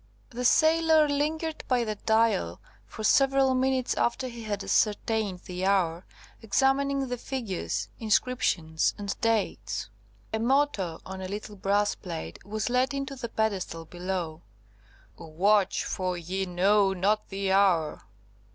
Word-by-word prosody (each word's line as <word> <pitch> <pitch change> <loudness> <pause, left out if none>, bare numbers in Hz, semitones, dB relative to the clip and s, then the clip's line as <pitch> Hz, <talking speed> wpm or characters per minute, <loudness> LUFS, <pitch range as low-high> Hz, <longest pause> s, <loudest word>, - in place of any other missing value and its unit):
The 250 +1 -4
sailor 315 +2 +5
lingered 310 +3 -1
by 250 -2 +2
the 215 -2 -2
Dial 220 - +1 0.3
for 215 - -8
several 270 +2 +4
minutes 260 0 +1
after 240 +2 0
he 235 -1 -9
had 205 -2 -3
ascertained 210 -3 0
the 180 0 -6
hour, 185 -3 +1 0.3
examining 270 +4 +1
the 245 -1 -4
figures, 230 -9 -3
inscriptions, 205 -8 +1
and 200 -1 -3
dates. 115 - -1 0.4
A 220 - 0
motto 235 - +1
on 190 0 -7
a 185 - -4
little 205 +2 -6
brass 205 +1 +1
plate 165 - -7
was 215 +1 -3
let 255 +2 +1
into 275 0 -4
the 240 -3 -6
pedestal 195 -7 -2
below: 175 -2 -4 0.8
"Watch, 190 +5 +2
for 185 -1 -2
ye 185 +3 -3
know 195 +2 +3
not 200 +4 0
the 195 -1 -2
hour." 185 -6 +2
210 Hz, 135 wpm, -27 LUFS, 185-255 Hz, 0.8 s, sailor